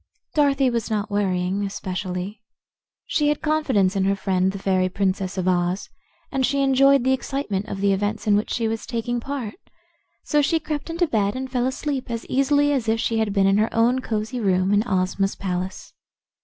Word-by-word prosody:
Dorothy 275 -3 +3
was 235 -2 -2
not 210 -1 -2
worrying, 190 -1 0
especially. 190 0 -4 0.6
She 295 - +1
had 295 - 0
confidence 265 -12 +2
in 190 -1 +1
her 195 +1 +2
friend, 190 -1 +1
the 195 - -6
fairy 185 -1 +1
Princess 190 0 -1
of 185 -1 -1
Oz, 180 +1 0 0.4
and 270 -1 0
she 275 +2 +2
enjoyed 275 0 +5
the 260 +1 +3
excitement 260 -7 -2
of 195 -2 -5
the 200 -1 +3
events 205 +2 -2
in 210 -1 +4
which 210 - 0
she 230 -2 0
was 220 -1 -3
taking 240 0 -2
part. 265 - -5 0.6
So 295 -1 +2
she 325 +3 +2
crept 300 0 -4
into 335 +2 +1
bed 210 -7 0
and 260 0 -5
fell 250 -1 +1
asleep 265 -1 -3
as 230 -1 -4
easily 285 +2 +2
as 240 -5 0
if 225 0 +1
she 225 -1 0
had 220 -2 0
been 195 -1 +2
in 195 +1 +4
her 220 - +1
own 235 +3 +3
cosy 220 +2 -3
room 190 -2 +2
in 205 - +4
Ozma's 195 0 0
palace. 185 0 -4
215 Hz, 195 wpm, -23 LUFS, 195-265 Hz, 0.6 s, enjoyed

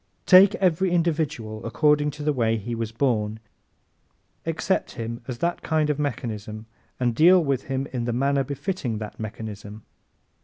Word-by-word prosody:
Take 195 +3 +7
every 185 -1 +2
individual 155 -11 -1
according 150 +5 +2
to 150 - -6
the 150 0 +1
way 115 -3 +1
he 110 +3 -5
was 115 -1 -3
born, 110 -3 0 1.1
accept 165 +4 -1
him 115 -1 -5
as 125 -3 -4
that 170 +6 -1
kind 155 -1 +1
of 150 - -3
mechanism 110 -5 -4 0.3
and 120 -2 +1
deal 175 +9 +6
with 135 -3 -1
him 135 0 -2
in 120 -2 -2
the 120 - -1
manner 140 +3 +1
befitting 140 - -3
that 105 -1 -7
mechanism. 110 -1 -7
130 Hz, 155 wpm, -24 LUFS, 110-155 Hz, 1.1 s, Take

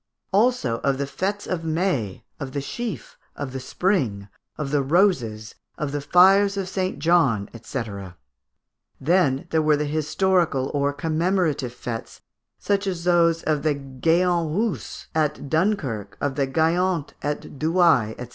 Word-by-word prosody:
Also 200 - +2
of 135 -1 0
the 140 - -1
fêtes 190 +9 -3
of 175 -3 -3
May, 160 - -1 0.2
of 135 -2 -6
the 140 - -1
sheaf, 175 - -6 0.2
of 135 -2 -5
the 135 - -3
spring, 130 - -1 0.3
of 150 -3 -3
the 145 -1 +2
roses, 135 - +1 0.2
of 150 -2 -3
the 145 0 -2
fires 195 +6 +5
of 195 -2 -2
St. 190 0 -2
John, 140 - +2
&c. 120 +2 -3 1.2
Then 145 -3 +2
there 160 - +3
were 155 -1 +3
the 150 - -1
historical 155 -1 +1
or 140 0 +1
commemorative 155 -3 0
fêtes, 115 -2 -6 0.4
such 200 0 0
as 180 -3 -3
those 170 -2 +3
of 150 -2 0
the 150 -1 +1
Géant 165 +5 0
Reuss 220 -2 -2
at 150 -3 -1
Dunkerque, 150 - -1
of 145 -1 -1
the 135 0 0
Gayant 165 +2 +1
at 145 -1 -4
Douai, 160 -9 +3
&c. 125 -1 -7
155 Hz, 145 wpm, -23 LUFS, 135-180 Hz, 1.2 s, fires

